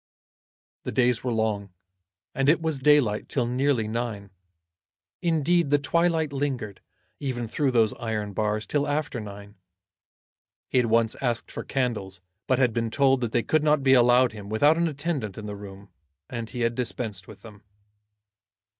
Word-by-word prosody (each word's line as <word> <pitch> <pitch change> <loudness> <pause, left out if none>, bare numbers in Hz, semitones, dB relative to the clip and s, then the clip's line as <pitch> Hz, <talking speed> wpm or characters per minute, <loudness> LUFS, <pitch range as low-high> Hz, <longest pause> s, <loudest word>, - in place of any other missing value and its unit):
The - - -5
days 125 +1 +2
were 125 - -1
long, 110 -3 -1 0.6
and 135 +1 +2
it 160 - +4
was 160 -4 -2
daylight 135 -7 +3
till 125 -4 0
nearly 125 -2 +1
nine. 110 -3 -4 0.9
Indeed 170 -1 +2
the 145 - +4
twilight 160 0 +1
lingered, 130 -8 -3 0.4
even 125 -4 -3
through 140 +5 0
those 115 -4 +3
iron 105 -3 -3
bars, 105 +1 -1
till 145 0 0
after 145 -3 -2
nine. 100 -1 -10 1.1
He 130 - +3
had 120 - +2
once 115 0 +2
asked 120 -3 -2
for - - -6
candles, 110 -8 -2 0.3
but 130 - +3
had 125 -3 +2
been 115 0 -1
told 135 +2 +3
that 120 -3 -2
they 120 -1 +1
could 155 -1 +1
not 150 -2 +3
be 135 -1 +5
allowed 125 0 +5
him 105 -2 -9
without 145 +9 +4
an 170 +1 +1
attendant 145 - -3
in 110 - -7
the 105 -1 -5
room, 100 0 -11 0.4
and 115 -2 -5
he 125 - -5
had 115 0 +1
dispensed 115 -5 -4
with 105 -2 -13
them. 105 -3 -13
120 Hz, 165 wpm, -26 LUFS, 110-140 Hz, 1.1 s, be